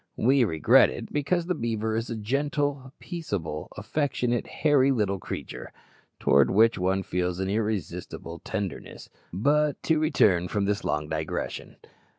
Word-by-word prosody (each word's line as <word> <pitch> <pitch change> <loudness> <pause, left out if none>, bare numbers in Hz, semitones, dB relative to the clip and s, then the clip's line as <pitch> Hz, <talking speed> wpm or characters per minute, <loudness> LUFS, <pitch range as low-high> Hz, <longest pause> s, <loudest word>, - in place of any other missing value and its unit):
We 130 +3 +4
regret 80 -7 +5
it, - - -7
because 165 +4 0
the 180 - 0
beaver 110 -5 -2
is 115 +2 -2
a 115 - -3
gentle, 140 +3 -1
peaceable, 100 - -5
affectionate, 120 +1 -1
hairy 145 -3 +3
little 105 -7 0
creature, - - -7 0.5
towards 70 -1 +4
which 115 +2 +4
one 95 +1 +1
feels 90 0 -2
an 95 0 -1
irresistible 105 -5 -3
tenderness. 95 -5 -6 0.2
But 145 - +1
to 160 -2 +2
return 95 - +3
from 100 +1 -1
this 100 0 -1
long 75 0 -1
digression. 80 0 -4
110 Hz, 140 wpm, -26 LUFS, 95-140 Hz, 0.5 s, regret